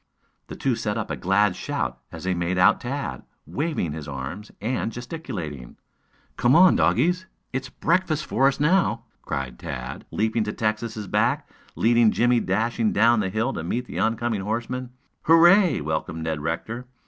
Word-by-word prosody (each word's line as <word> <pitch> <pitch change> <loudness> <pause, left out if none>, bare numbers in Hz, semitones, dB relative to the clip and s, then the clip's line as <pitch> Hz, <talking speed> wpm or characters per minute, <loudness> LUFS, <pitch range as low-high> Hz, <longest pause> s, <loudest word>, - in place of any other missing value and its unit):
The - - -8
two 130 -3 0
set 105 -1 -2
up 110 - -3
a - - -1
glad 95 +1 +2
shout 60 0 -3
as - - -9
they 95 0 0
made 85 +1 -1
out 90 +4 +5
Tad, 135 +3 -4 0.2
waving 150 - -2
his 75 -1 -7
arms 70 +10 -6
and 115 +1 -2
gesticulating. 105 - -7 0.6
"Come 125 +4 +4
on, 180 +2 +7
doggies! 160 - +2 0.3
It's 130 0 -3
breakfast 165 0 0
for 135 - +2
us, 135 - 0
now!" 170 +6 +2 0.2
cried 65 -2 -4
Tad, - - -6
leaping 110 +1 0
to 105 - -3
Texas' 110 0 -2
back, 120 +9 +1 0.3
leading 115 0 +4
Jimmie 120 +2 +3
dashing 110 +3 0
down 115 +2 +4
the 100 -3 0
hill 110 +7 -1
to - - -4
meet 120 +9 -2
the - - -6
oncoming 115 -2 0
horsemen. 120 +5 -3 0.4
"Hooray!" 170 - +6
welcomed 80 +2 -3
Ned 80 -2 -2
Rector. 110 +10 -4
115 Hz, 160 wpm, -24 LUFS, 95-130 Hz, 0.6 s, on